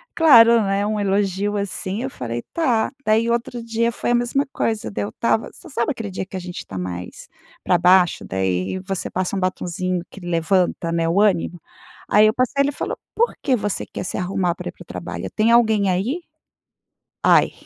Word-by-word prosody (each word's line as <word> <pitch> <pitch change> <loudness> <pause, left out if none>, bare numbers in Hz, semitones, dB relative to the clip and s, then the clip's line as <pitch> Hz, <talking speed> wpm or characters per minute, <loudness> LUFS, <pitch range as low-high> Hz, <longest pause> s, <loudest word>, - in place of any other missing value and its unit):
claro, 235 -8 +7
né, 195 0 0
um 210 0 -1
elogio, 200 0 0
assim, 200 +2 -3
eu 265 - -2
falei: 120 - -5
"Tá" 245 -9 +1
daí 220 +2 +3
outro 240 0 -2
dia 230 0 0
foi 240 - -2
a - - +4
mesma 240 +4 +1
coisa. 220 - -1
Daí 105 +1 -3
eu - - -5
estava 225 - 0
você 345 - -13
sabe 235 -2 -1
aquele 225 -7 -5
dia 190 - -4
que 190 - -11
a - - -3
gente 175 0 -7
tá 95 - -7
mais 90 -1 -6 0.3
pra 180 - +3
baixo. 180 0 +4
Daí 95 - -1
você 190 0 -4
passa 185 +1 -2
um - - 0
batonzinho 185 -1 -2
que - - -11
levanta, 175 0 0
né, 165 0 0
o 185 +5 +3
ânimo. 175 -4 +1 0.5
Aí 210 +1 +6
eu 215 - +2
passei, 255 +3 +1
ele 285 - 0
falou: - - -4 0.2
"Por 470 +2 +2
que 265 - +2
você 205 -3 -2
quer - - -6
se - - -3
arrumar 180 -1 -1
para - - -7
ir - - -9
para - - -13
o - - -32
trabalho? - - -6
Tem 220 +1 +2
alguém 220 -4 +4
aí?" 215 - -1 1.0
Ai. - - +5
200 Hz, 200 wpm, -21 LUFS, 180-230 Hz, 1.0 s, claro